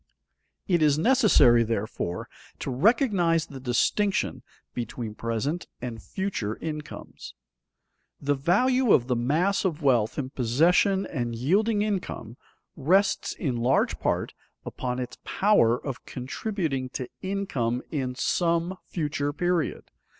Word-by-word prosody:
It 175 -3 +2
is 150 -2 +4
necessary 175 - +5
therefore 110 -5 -3 0.3
to - - -4
recognize 175 - +3
the 140 -4 -10
distinction 130 +4 0 0.3
between 120 -2 -5
present 115 +10 -3
and 120 -3 -6
future 185 - -3
incomes. 150 -2 -7 0.8
The 145 0 +1
value 225 - +3
of 120 - +4
the 125 -1 0
mass 155 +12 +1
of 165 -5 -2
wealth 120 -5 +2
in 135 -3 -3
possession 170 - +3
and 120 -6 -3
yielding 205 - +2
income, 185 - -3 0.4
rests 190 +8 +2
in 130 -7 -2
large 125 +3 +1
part - - -1 0.3
upon 125 -1 -3
its 125 -1 -5
power 190 - +3
of 135 -4 -6
contributing 135 - -3
to 130 - -5
income 140 -12 -2
in 130 -4 -2
some 170 +5 0
future 145 -3 -2
period. 175 0 -1
145 Hz, 120 wpm, -26 LUFS, 125-190 Hz, 0.8 s, necessary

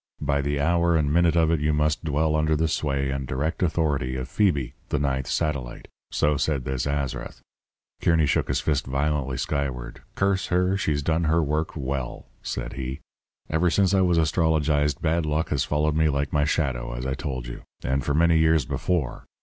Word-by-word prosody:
By 70 -1 0
the 70 0 -1
hour 85 +3 +2
and 75 -2 +1
minute 85 0 +3
of 80 -1 +3
it 85 - +2
you 75 +1 +1
must 75 +2 +1
dwell 80 0 +1
under 80 0 +2
the 80 +2 +1
sway 70 -3 -1
and 70 -1 -3
direct 75 +6 -2
authority 75 -7 0
of 65 0 -4
Phoebe, 75 - +1 0.2
the - - 0
ninth 65 -2 -1
satellite." 70 -7 -2 0.2
So 75 0 +1
said 70 -3 -1
this 65 0 -2
Azrath.' 70 -2 -3 0.6
Kearny 80 -2 +3
shook 70 - +1
his - - 0
fist 70 -4 0
violently 70 -1 -1
skyward. 65 -5 -3
'Curse 95 -1 +1
her, 90 +2 +2
she's 75 -7 0
done 80 +2 +1
her 80 +1 +3
work 75 +2 -1
well,' 65 -3 -4 0.2
said - - -4
he. 65 0 -5 0.5
'Ever 80 +3 +2
since 95 +2 +2
I 95 - +4
was 90 -2 +3
astrologized, 75 -3 +1
bad 85 +1 +1
luck 75 +1 0
has 70 -3 0
followed 75 +1 0
me 80 0 +3
like 70 0 -1
my 75 0 +3
shadow, 65 -6 -1
as - - -5
I 65 - -1
told 65 -2 -4
you. - - -7 0.2
And 65 +1 0
for 70 - 0
many 85 0 +4
years 80 -3 +3
before. 80 -1 -2
75 Hz, 190 wpm, -25 LUFS, 70-80 Hz, 0.6 s, I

